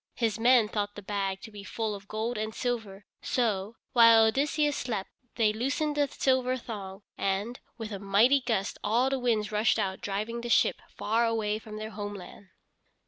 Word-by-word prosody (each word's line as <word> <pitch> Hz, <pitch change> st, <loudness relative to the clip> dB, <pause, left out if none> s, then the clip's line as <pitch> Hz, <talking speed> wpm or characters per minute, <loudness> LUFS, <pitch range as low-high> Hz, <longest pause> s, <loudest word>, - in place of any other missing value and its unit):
His 225 Hz, -2 st, 0 dB
men 240 Hz, -1 st, +5 dB
thought 205 Hz, -1 st, -3 dB
the 205 Hz, -, -9 dB
bag 195 Hz, -1 st, -2 dB
to 220 Hz, -, -10 dB
be 205 Hz, -1 st, -9 dB
full 220 Hz, +1 st, -3 dB
of 200 Hz, 0 st, -9 dB
gold 220 Hz, +3 st, -2 dB
and 215 Hz, 0 st, -3 dB
silver, 220 Hz, -5 st, -3 dB, 0.2 s
so, 215 Hz, -3 st, -1 dB, 0.2 s
while 230 Hz, -2 st, +8 dB
Odysseus 290 Hz, +5 st, +1 dB
slept 215 Hz, -6 st, -3 dB, 0.2 s
they 215 Hz, -3 st, +3 dB
loosened 285 Hz, +6 st, -1 dB
the 290 Hz, -1 st, +2 dB
silver 260 Hz, -1 st, +1 dB
thong, 200 Hz, -5 st, -8 dB, 0.2 s
and, 200 Hz, +5 st, -1 dB, 0.2 s
with 225 Hz, -2 st, -6 dB
a 200 Hz, -, -4 dB
mighty 215 Hz, +8 st, +4 dB
gust 220 Hz, -6 st, -1 dB
all 240 Hz, +5 st, +2 dB
the 270 Hz, -, 0 dB
winds 225 Hz, -4 st, 0 dB
rushed 210 Hz, 0 st, +2 dB
out 190 Hz, -1 st, -2 dB
driving 215 Hz, +4 st, -3 dB
the 240 Hz, -, -5 dB
ship -, -, +3 dB
far 230 Hz, +2 st, 0 dB
away 215 Hz, -2 st, 0 dB
from 215 Hz, -1 st, -9 dB
their 215 Hz, +1 st, -6 dB
homeland. 205 Hz, -2 st, -8 dB
220 Hz, 180 wpm, -29 LUFS, 205-240 Hz, 0.2 s, while